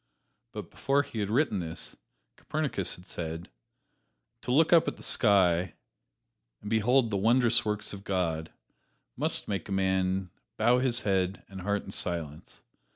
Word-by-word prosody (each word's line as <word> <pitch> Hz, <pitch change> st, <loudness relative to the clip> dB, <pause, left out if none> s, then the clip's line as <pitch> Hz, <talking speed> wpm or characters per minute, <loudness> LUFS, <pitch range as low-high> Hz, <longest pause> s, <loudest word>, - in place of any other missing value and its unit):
But -, -, -8 dB
before 140 Hz, +1 st, +1 dB
he 115 Hz, -, -7 dB
had 100 Hz, -1 st, -1 dB
written 115 Hz, -3 st, +1 dB
this, 80 Hz, -2 st, -6 dB, 0.4 s
Copernicus 145 Hz, -, -1 dB
had 90 Hz, -, -15 dB
said: 80 Hz, 0 st, -6 dB, 0.9 s
"To 125 Hz, -, -4 dB
look 160 Hz, +6 st, +4 dB
up 165 Hz, -, +6 dB
at -, -, -3 dB
the -, -, -13 dB
sky, 90 Hz, -5 st, +3 dB, 0.8 s
and 105 Hz, -, -8 dB
behold 115 Hz, +2 st, +3 dB
the 100 Hz, -, 0 dB
wondrous 115 Hz, +2 st, +3 dB
works 105 Hz, -1 st, -3 dB
of 100 Hz, -1 st, -8 dB
God, 85 Hz, -5 st, -2 dB, 0.6 s
must -, -, +1 dB
make 100 Hz, -3 st, -3 dB
a -, -, -6 dB
man 95 Hz, -1 st, 0 dB, 0.3 s
bow 125 Hz, +1 st, +4 dB
his 125 Hz, -1 st, 0 dB
head 95 Hz, -1 st, 0 dB
and 95 Hz, -1 st, -9 dB
heart 100 Hz, +2 st, -1 dB
in -, -, -9 dB
silence. 80 Hz, -4 st, -5 dB
100 Hz, 155 wpm, -29 LUFS, 90-120 Hz, 0.9 s, up